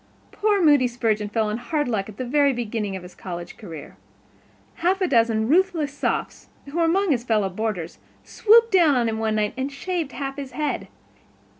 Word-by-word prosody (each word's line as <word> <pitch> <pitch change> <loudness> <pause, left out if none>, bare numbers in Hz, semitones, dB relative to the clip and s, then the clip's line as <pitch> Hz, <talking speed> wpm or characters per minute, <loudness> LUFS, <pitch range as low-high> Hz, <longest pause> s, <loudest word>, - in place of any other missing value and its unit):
Poor 415 -1 +1
Moody 290 -5 +5
Spurgeon 220 -4 -1
fell 220 0 0
on 215 +2 -3
hard 295 +3 -1
luck 215 -4 -2
at 210 - -12
the 255 - -3
very 280 +2 +3
beginning 220 -4 -3
of 185 - -7
his 180 - -12
college 175 -2 -7
career. 165 -8 -10 0.8
Half 365 +3 +1
a 370 - +1
dozen 225 -5 +2
ruthless 325 -2 +2
Sophs, - - -3 0.2
who 285 +4 -7
were 335 - +3
among 375 +2 +2
his 240 -4 +1
fellow 215 -5 +1
boarders, 185 -4 -4 0.2
swooped 460 +2 +4
down 340 -7 +5
upon 235 -2 +2
him 220 0 -3
one 220 -1 0
night 210 -1 0
and 265 +2 -3
shaved 330 -1 -3
half 275 0 -5
of - - -2
his 270 -2 -8
head. 300 -1 -2
250 Hz, 195 wpm, -23 LUFS, 215-310 Hz, 0.8 s, Moody